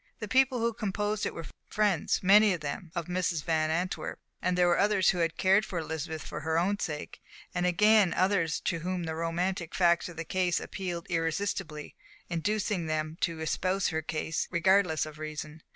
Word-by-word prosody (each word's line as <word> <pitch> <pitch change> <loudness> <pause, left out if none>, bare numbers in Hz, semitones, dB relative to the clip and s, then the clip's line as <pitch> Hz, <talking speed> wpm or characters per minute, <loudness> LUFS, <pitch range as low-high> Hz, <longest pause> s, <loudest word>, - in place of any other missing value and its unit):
The 215 - -5
people 260 +3 +3
who 230 0 0
composed 210 -1 -2
it - - -5
were 165 - -6 0.2
friends, 205 -6 +1
many 205 +2 +6
of 165 - -9
them, 150 +3 -5
of 170 - -2
Mrs. 175 -3 -1
Van 155 -2 +1
Antwerp, 175 +4 -2 0.2
and 180 0 0
there 180 0 +4
were 175 - +3
others 200 -2 +4
who 180 - -3
had 165 -1 0
cared 195 +3 +4
for 185 - -5
Elizabeth 160 -1 -4
for 150 - -5
her 160 +1 -1
own 200 +4 +1
sake, 150 -4 -5 0.3
and 180 0 +1
again 210 +1 +5
others 185 -4 +1
to 170 - -1
whom 180 +1 -3
the 160 -1 -3
romantic 170 +2 -2
facts 175 -1 +3
of 170 - -11
the 165 - -4
case 180 -1 +1
appealed 175 -3 -5
irresistibly, 165 -2 -2 0.4
inducing 200 0 -1
them 155 0 -2
to 165 -1 -1
espouse 185 +4 0
her 160 -1 -1
cause 160 +1 -2
regardless 180 -2 +3
of 155 0 -10
reason. 155 0 -6
175 Hz, 185 wpm, -29 LUFS, 160-195 Hz, 0.4 s, many